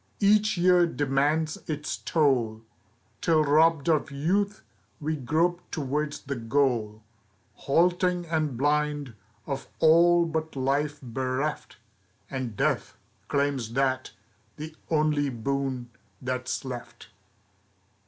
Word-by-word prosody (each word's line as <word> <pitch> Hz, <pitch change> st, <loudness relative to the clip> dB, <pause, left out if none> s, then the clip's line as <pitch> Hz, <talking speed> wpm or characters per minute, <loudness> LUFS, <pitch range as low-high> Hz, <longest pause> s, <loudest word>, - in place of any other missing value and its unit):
Each 210 Hz, 0 st, +3 dB
year 175 Hz, 0 st, +5 dB
demands 145 Hz, +2 st, 0 dB
its 150 Hz, -1 st, -2 dB
toll, 125 Hz, -8 st, +1 dB, 0.6 s
Till 160 Hz, -2 st, +3 dB
robbed 155 Hz, 0 st, +3 dB
of 155 Hz, -3 st, +2 dB
youth, 195 Hz, +9 st, -1 dB, 0.4 s
we 155 Hz, +1 st, -1 dB
grope 165 Hz, +6 st, 0 dB
toward 150 Hz, 0 st, -2 dB
the 140 Hz, -, -2 dB
goal, 115 Hz, -3 st, 0 dB, 0.5 s
Halting 180 Hz, +3 st, +1 dB
and 155 Hz, -6 st, -1 dB
blind, 145 Hz, -1 st, 0 dB, 0.3 s
of 135 Hz, -2 st, -4 dB
all 170 Hz, +2 st, +5 dB
but 160 Hz, -1 st, -3 dB
life 145 Hz, +3 st, 0 dB
bereft, 130 Hz, +4 st, -3 dB, 0.5 s
And 130 Hz, -6 st, -4 dB
death -, -, 0 dB, 0.3 s
claims 140 Hz, -5 st, -1 dB
that 130 Hz, 0 st, 0 dB, 0.5 s
the 155 Hz, +1 st, -7 dB
only 150 Hz, -2 st, +2 dB
boon 130 Hz, 0 st, -3 dB, 0.3 s
that's 130 Hz, 0 st, -3 dB
left. 125 Hz, -2 st, -8 dB
145 Hz, 105 wpm, -27 LUFS, 130-160 Hz, 0.6 s, year